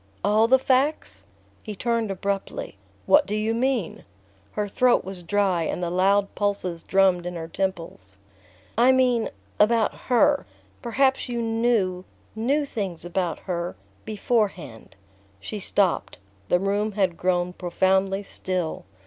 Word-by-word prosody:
"All 215 +3 +4
the 260 +2 +6
facts?" 260 - 0 0.4
He 210 - -7
turned 230 0 -1
abruptly. 200 - -3 0.3
"What 290 0 +5
do 210 - -2
you 215 +1 0
mean?" 245 -5 -1 0.5
Her 210 -1 -1
throat 245 +4 +3
was 190 -1 -6
dry 190 -1 +1
and 170 +2 -2
the 170 - -2
loud 195 +2 +2
pulses 195 -5 -2
drummed 185 -2 +2
in 180 - -5
her 165 -1 -5
temples. 165 - -4 0.6
"I 250 +2 +6
mean 250 -3 +2 0.3
about 220 +1 +3
her...Perhaps 265 0 +1
you 240 -1 -2
knew... 225 -5 +1 0.3
knew 275 +7 +1
things 195 - -4
about 175 -1 -2
her... 175 -1 -3 0.3
beforehand." 195 - -2 0.4
She 210 - -6
stopped. 195 -1 0 0.3
The 175 - +3
room 205 +2 0
had 190 -4 +1
grown 180 0 0
profoundly 190 +2 +1
still. 185 -4 -3
200 Hz, 130 wpm, -24 LUFS, 180-230 Hz, 0.6 s, the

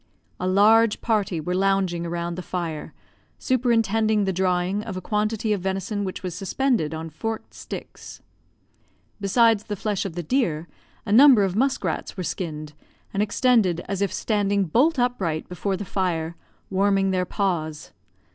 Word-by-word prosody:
A 185 - -1
large 210 +3 +5
party 205 -7 0
were 175 +4 -3
lounging 190 -3 +1
around 170 0 -3
the 185 - -5
fire, 170 -4 -4 0.5
superintending 225 -4 +2
the 190 -1 0
drying 185 +2 0
of 205 -3 -6
a - - -2
quantity 215 +2 -1
of 200 - -2
venison 195 +2 -2
which 190 0 -5
was 180 -2 -3
suspended 195 - 0
on 160 0 -6
forked 225 +8 -5
sticks. - - -9 1.0
Besides 220 +1 +3
the 210 - -3
flesh 200 0 -2
of 195 - -5
the 175 - -3
deer, 170 - 0 0.4
a 205 - -3
number 250 -1 +8
of 190 -1 -1
musk 265 +2 +1
rats 170 +2 -3
were 185 - -3
skinned, 155 -4 -4 0.4
and 195 - 0
extended 210 -5 +2
as 195 -1 -3
if 200 - +1
standing 205 -2 +1
bolt 270 - +2
upright 195 -11 -1
before 190 +2 -2
the 205 - -5
fire, 170 -4 -2 0.4
warming 195 0 +2
their 185 -1 0
paws. 165 -7 -2
195 Hz, 155 wpm, -24 LUFS, 175-215 Hz, 1.0 s, number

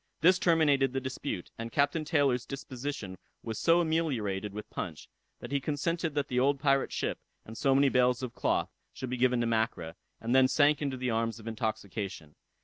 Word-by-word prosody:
This 180 +3 +5
terminated 145 -6 +3
the 135 - 0
dispute, 130 -7 -5
and 115 0 -5
Captain 145 +4 +1
Taylor's 140 -6 +1
disposition 130 -8 -6 0.2
was 110 -1 -4
so 170 +1 +4
ameliorated 125 - -1
with 105 +1 -7
punch, 80 -4 -6 0.3
that 120 - -8
he 140 - +1
consented 155 +2 -2
that 145 -2 0
the 125 - 0
old 140 +2 +2
pirate 135 -1 +2
ship, - - -2 0.3
and 110 - -9
so 135 +3 +2
many 140 +1 +5
bales 125 -1 +2
of 125 -2 -4
cloth, - - 0 0.2
should 130 -2 -6
be 125 - -1
given 125 0 +3
to - - +1
Mackra, 110 -8 -1 0.3
and 115 +2 -2
then 130 0 +6
sank 145 +2 +3
into 140 -3 -2
the 125 -1 -1
arms 115 0 -1
of 110 - -13
intoxication. 100 -7 -4
130 Hz, 190 wpm, -30 LUFS, 115-145 Hz, 0.3 s, then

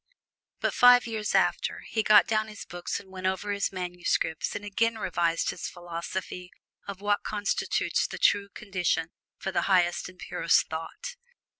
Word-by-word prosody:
But - - +1
five 245 0 +7
years 220 -3 -2
after, - - +1
he 220 - +1
got 210 -1 +6
down 215 0 0
his 215 -1 -9
books 175 0 -4
and 190 - -16
went 185 0 -3
over 190 +2 -1
his 200 0 -1
manuscripts 180 -3 -2
and 205 0 -5
again 230 +3 0
revised 170 -4 0
his - - -5
philosophy 175 +1 -6 0.4
of 200 -1 -7
what 205 0 +1
constitutes 205 -2 0
the - - -7
true 200 0 +3
condition 180 -5 -2 0.3
for 190 - -4
the 185 - +1
highest 180 -2 +2
and 185 - -16
purest 170 -2 +2
thought. 165 - -6
190 Hz, 160 wpm, -28 LUFS, 175-210 Hz, 0.4 s, five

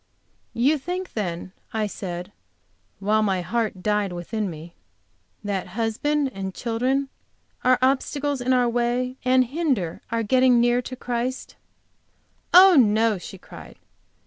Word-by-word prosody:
"You 280 +6 +2
think, 360 +6 -5
then," 180 -4 -4 0.2
I 220 -1 0
said, 180 -3 -6 0.7
while 210 +3 +1
my 190 -4 +1
heart 210 -1 -2
died 210 -2 0
within 195 +4 -3
me, 165 +1 -10 0.7
"that 200 -3 -3
husband 270 +5 0
and 190 -1 -5
children 255 +4 -1 0.5
are 255 0 +4
obstacles 275 +1 0
in 250 +1 0
our 250 -1 +3
way, 245 +2 -1
and 255 0 +4
hinder 260 - -2
our 230 0 -1
getting 255 +2 +4
near 240 +1 +3
to 255 +1 -7
Christ." 245 +1 -4 1.0
"Oh, 370 +1 +8
no!" 220 -4 +3
she 190 - -9
cried. - - -13
235 Hz, 130 wpm, -24 LUFS, 205-260 Hz, 1.0 s, Oh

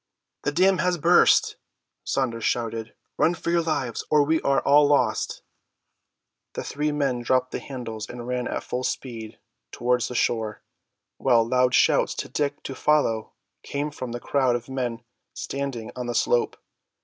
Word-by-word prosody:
"The - - -1
dam 185 +3 +3
has 180 +2 +1
burst!" 150 - +4 0.5
Saunders 115 -4 -1
shouted. 115 -1 -2 0.2
"Run 170 +2 +3
for 170 - -3
your 170 0 +3
lives, 145 -7 -2
or 150 -1 +5
we 160 +2 +1
are 140 0 +2
all 145 +1 +5
lost!" 125 -6 +1 1.1
The - - -4
three 150 +1 -2
men 140 -4 0
dropped 130 +1 +1
the - - -3
handles 115 -6 -7
and 120 -1 -7
ran 125 0 -2
at - - -3
full 125 +1 -3
speed 115 -4 -5 0.3
towards 125 0 0
the 125 - -7
shore, 110 -3 -1 0.5
while 115 -1 +3
loud 125 +1 +3
shouts - - +3
to - - -5
Dick 145 -1 -2
to 135 - -5
follow 130 -6 +1 0.3
came 145 +1 -3
from 130 -4 -6
the 120 - -4
crowd 130 -1 +1
of 120 +1 -5
men 125 -3 -3 0.3
standing 135 -5 -4
on 125 -1 -4
the 120 - -3
slope. 120 -1 +1
125 Hz, 160 wpm, -25 LUFS, 120-145 Hz, 1.1 s, or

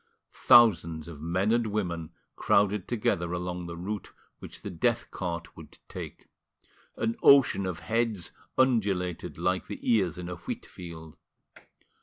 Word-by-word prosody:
Thousands 85 -9 +5
of 80 -4 -9
men 90 +6 0
and 120 -1 +2
women 85 -6 -3 0.2
crowded 100 -1 +2
together 95 -7 0
along 90 0 -4
the 85 0 -7
route 100 +4 -5 0.3
which - - -10
the - - -5
death 120 +7 0
cart 85 -3 -5
would - - -13
take; - - -8 0.7
an 115 0 -1
ocean 135 -8 +6
of 90 -2 -4
heads 115 -5 -1 0.3
undulated 100 -9 +1
like 90 0 -1
the - - -5
ears 95 -9 +2
in 90 -1 -6
a 90 0 -5
wheatfield. 85 -2 -8
90 Hz, 135 wpm, -28 LUFS, 85-110 Hz, 0.7 s, ocean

